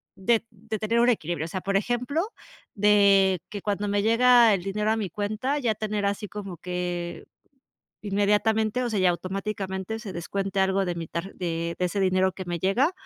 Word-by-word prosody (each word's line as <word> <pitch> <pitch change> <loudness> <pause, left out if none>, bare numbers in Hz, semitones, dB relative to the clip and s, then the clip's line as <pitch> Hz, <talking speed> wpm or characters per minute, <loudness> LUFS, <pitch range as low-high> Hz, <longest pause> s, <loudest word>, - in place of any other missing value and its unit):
de 225 +4 +1
de 220 +1 -6
tener 225 +3 +1
un 240 +1 +5
equilibrio, 170 -8 -1
o - - -5
sea, 185 +2 -4
por 195 +1 -2
ejemplo, 250 - -1 0.5
de 200 -3 +4
que 205 - -6
cuando 205 0 -1
me 205 0 +1
llega 235 0 +6
el 195 - 0
dinero 210 +3 0
a 220 - +1
mi 205 -4 -2
cuenta, 215 - -2
ya 240 -5 +1
tener 210 -1 -2
así 200 +1 -1
como 195 -3 -7
que 175 -1 -4 0.8
inmediatamente, 210 +3 +1
o 245 - -1
sea, 215 -3 -1
y 185 - +2
automáticamente 190 +3 -2
se 215 -4 -7
descuente 195 +3 -3
algo 190 0 +2
de 175 -1 -2
mi 165 -1 -5
tarj 170 +5 -5
de 170 -1 -3
de 180 - 0
ese 180 +3 -2
dinero 185 0 +2
que 190 - -6
me 175 0 -2
llega 215 - +2
200 Hz, 195 wpm, -26 LUFS, 185-220 Hz, 0.8 s, llega